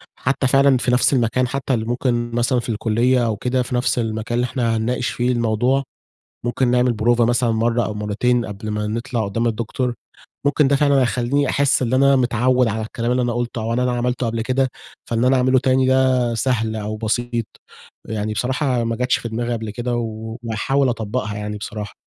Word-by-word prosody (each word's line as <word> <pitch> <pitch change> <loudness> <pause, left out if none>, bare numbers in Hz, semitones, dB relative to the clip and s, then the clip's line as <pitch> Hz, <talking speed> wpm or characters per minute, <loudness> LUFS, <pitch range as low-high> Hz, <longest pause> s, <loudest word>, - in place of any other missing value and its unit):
حتّى 135 0 0
فعلًا 135 0 +4
في 125 - 0
نفس 125 +3 +3
المكان 125 0 +1
حتّى 135 +1 -2
ال 110 -1 -1
ممكن 120 -1 -1
مثلًا 120 +1 +1
في 120 - -6
الكلية 115 +3 +1
أو 110 -2 0
كده 125 +3 0
في 125 - -4
نفس 125 0 +1
المكان 110 +1 -2
اللي 125 - +1
إحنا 120 -3 -1
هنناقش 120 +3 -1
فيه 125 +1 0
الموضوع، 120 +3 +1 0.6
ممكن 120 +2 0
نعمل 125 0 +3
بروفة 120 +2 +2
مثلًا 120 0 +2
مرّة 115 +2 +1
أو - - -3
مرّتين 110 +4 0
قبل 105 +1 -6
ما 105 0 -2
نطلع 115 +1 -2
قدّام 115 +4 -1
الدكتور، 120 +2 -2 0.5
ممكن 145 0 +3
ده 140 - +3
فعلًا 140 -1 +3
هيخليني 130 +3 +1
أحس 140 -1 +2
إن 125 -1 0
أنا 140 +1 +5
متعوّد 125 0 +2
على 110 0 -2
الكلام 115 +2 -3
اللي 125 - +2
أنا 120 - -1
قلتُه 120 -1 -3
أو 115 +1 -1
إن 120 - 0
أنا 125 0 +1
عملته 125 +1 -1
قبل 115 0 -2
كده، 130 +3 +1 0.4
فإن 115 +1 0
أنا 130 +1 +4
أعمله 130 +1 +3
تاني 130 0 +2
ده 130 -2 +2
سهل 110 -2 0
أو 110 0 -4
بسيط، 115 +1 -1 0.6
أ - - -5
يعني 105 0 -2
بصراحة 130 +1 0
ما 115 0 -1
جاتش 125 +2 +1
في 115 - -5
دماغي 120 +2 -2
قبل 110 -2 -4
كده 120 +3 -3
وهاحاول 115 +4 -2
أطُبقها 110 -2 -3
يعني 105 0 -4
بصراحة، 105 0 -6
120 Hz, 200 wpm, -20 LUFS, 110-130 Hz, 0.6 s, أنا